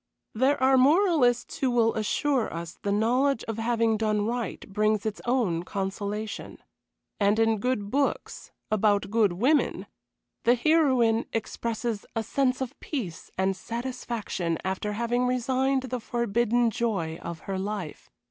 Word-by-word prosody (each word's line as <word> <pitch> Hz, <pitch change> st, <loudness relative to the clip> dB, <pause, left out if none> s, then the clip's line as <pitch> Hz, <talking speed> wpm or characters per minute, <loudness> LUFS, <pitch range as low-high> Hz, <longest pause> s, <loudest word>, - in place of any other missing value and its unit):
There 260 Hz, +6 st, +2 dB
are 265 Hz, 0 st, +5 dB
moralists 290 Hz, -4 st, +3 dB
who 265 Hz, -, +2 dB
will 230 Hz, -2 st, +3 dB
assure 245 Hz, +4 st, 0 dB
us 170 Hz, 0 st, -7 dB
the 200 Hz, -, -1 dB
knowledge 240 Hz, +5 st, +2 dB
of 225 Hz, 0 st, -5 dB
having 225 Hz, -1 st, +1 dB
done 215 Hz, -1 st, 0 dB
right 240 Hz, +1 st, -3 dB
brings 215 Hz, +1 st, +1 dB
its 215 Hz, -1 st, -3 dB
own 230 Hz, -9 st, +1 dB
consolation. 200 Hz, +3 st, -4 dB, 0.6 s
And 205 Hz, +1 st, +3 dB
in 225 Hz, -1 st, +2 dB
good 210 Hz, -3 st, -1 dB
books, 280 Hz, +1 st, -1 dB, 0.2 s
about 205 Hz, -1 st, +2 dB
good 215 Hz, -5 st, +3 dB
women, 260 Hz, -, +1 dB, 0.6 s
the 240 Hz, -, +5 dB
heroine 250 Hz, -5 st, +3 dB
experiences 225 Hz, 0 st, -3 dB
a 225 Hz, -, 0 dB
sense 260 Hz, +1 st, 0 dB
of 260 Hz, -, -5 dB
peace 210 Hz, -, -5 dB
and 190 Hz, +1 st, +1 dB
satisfaction 230 Hz, -7 st, -3 dB
after 190 Hz, +2 st, -2 dB
having 240 Hz, +3 st, 0 dB
resigned 260 Hz, +2 st, +1 dB
the 255 Hz, -1 st, -3 dB
forbidden 235 Hz, 0 st, +1 dB
joy 190 Hz, -9 st, -2 dB
of 170 Hz, -1 st, -6 dB
her 190 Hz, -1 st, -4 dB
life. 195 Hz, -5 st, -5 dB
225 Hz, 140 wpm, -27 LUFS, 205-250 Hz, 0.6 s, are